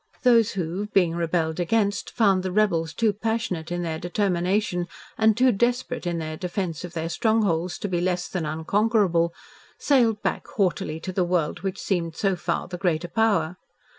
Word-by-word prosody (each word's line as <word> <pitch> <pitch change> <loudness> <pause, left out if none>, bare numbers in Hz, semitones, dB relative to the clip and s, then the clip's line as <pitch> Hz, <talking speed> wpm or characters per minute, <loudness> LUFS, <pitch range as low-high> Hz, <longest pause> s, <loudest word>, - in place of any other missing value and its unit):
Those 235 -4 +5
who, 185 +2 -3
being 185 -5 +2
rebelled 165 -1 -1
against, 205 +3 0
found 195 -5 +3
the 185 0 -3
rebels 175 -5 +1
too 220 +5 +1
passionate 205 -6 -2
in 175 0 -2
their 160 -2 -3
determination 180 0 0 0.3
and 220 -1 +3
too 255 +1 +5
desperate 240 0 -1
in 170 -1 -1
their 155 -1 -4
defence 180 -1 -3
of 175 -1 -7
their 165 -1 -2
strongholds 185 -3 +1
to - - -3
be 175 -3 -1
less 180 0 0
than 180 -3 -3
unconquerable, 170 +2 +1 0.5
sailed 235 -7 +2
back - - -2
haughtily 175 -5 -1
to 185 - -5
the 185 - +2
world 175 -3 0
which 195 -1 -3
seemed 170 -4 -1
so 195 0 +1
far 175 -1 -2
the 180 0 -7
greater 175 -2 0
power. 200 -4 +1
180 Hz, 170 wpm, -25 LUFS, 170-210 Hz, 0.5 s, Those